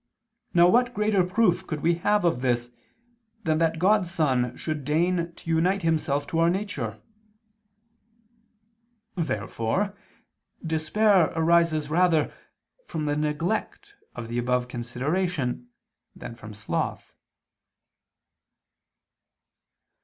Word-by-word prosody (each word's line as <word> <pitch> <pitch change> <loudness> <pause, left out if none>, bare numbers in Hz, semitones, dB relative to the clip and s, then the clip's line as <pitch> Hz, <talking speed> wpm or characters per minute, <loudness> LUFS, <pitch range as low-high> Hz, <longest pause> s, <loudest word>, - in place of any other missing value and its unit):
Now 175 0 +7
what 245 +5 +3
greater 210 -2 +2
proof 185 -1 +1
could 150 -2 -4
we 170 +3 +3
have 205 -1 +2
of 145 -8 +1
this 120 -1 0 0.7
than 155 -2 +1
that 165 -1 +1
God's 190 +1 +3
Son 130 -7 0
should 155 -3 -4
deign 170 +3 0
to - - -16
unite 180 +4 +2
Himself 150 -3 0
to 165 - -1
our 165 0 +4
nature?" 170 - -3 2.2
Therefore 165 - -2 0.7
despair 170 +3 +3
arises 165 -2 +2
rather 165 -2 +2 0.5
from 155 -2 -3
the 145 0 0
neglect 165 - -2 0.2
of 120 -2 -6
the 120 +1 -2
above 125 0 0
consideration 125 +2 -2 0.5
than - - -8
from 110 -2 -11
sloth. 105 - -3
160 Hz, 105 wpm, -26 LUFS, 130-180 Hz, 2.2 s, Now